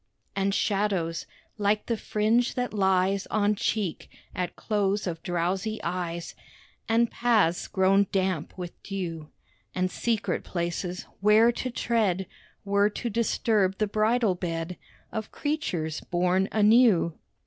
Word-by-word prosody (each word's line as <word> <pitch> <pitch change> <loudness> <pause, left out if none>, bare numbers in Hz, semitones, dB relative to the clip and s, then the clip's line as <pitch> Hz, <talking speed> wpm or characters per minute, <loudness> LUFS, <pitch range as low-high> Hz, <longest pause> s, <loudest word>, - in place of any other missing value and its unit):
And 195 0 +1
shadows... 195 -5 0 0.3
like 210 +1 +1
the 230 - 0
fringe 220 +3 +1
that 250 -2 -2
lies 190 0 +2
On 210 -1 +2
cheek, 210 -4 -2 0.2
at 180 -1 -3
close 205 -1 0
of 165 -3 -4
drowsy 185 +5 -1
eyes, 170 -1 -3 0.6
And 230 +1 +3
paths, 215 -8 +2
grown 195 +1 +3
damp 185 -5 -1
with 175 -2 -7
dew; 165 -6 -5 0.5
And 185 0 0
secret 230 -3 -1
places, 175 +1 -3
where 215 +3 +5
to 255 +2 -4
tread 215 -6 0 0.4
Were 200 +1 +3
to 235 +3 -4
disturb 210 -3 +1
the 215 - +2
bridal 215 +1 +2
bed 170 -1 -4 0.4
Of 220 -1 -5
creatures 175 - -2
born 180 +2 +1
anew. 215 -5 +5
195 Hz, 125 wpm, -27 LUFS, 180-215 Hz, 0.6 s, where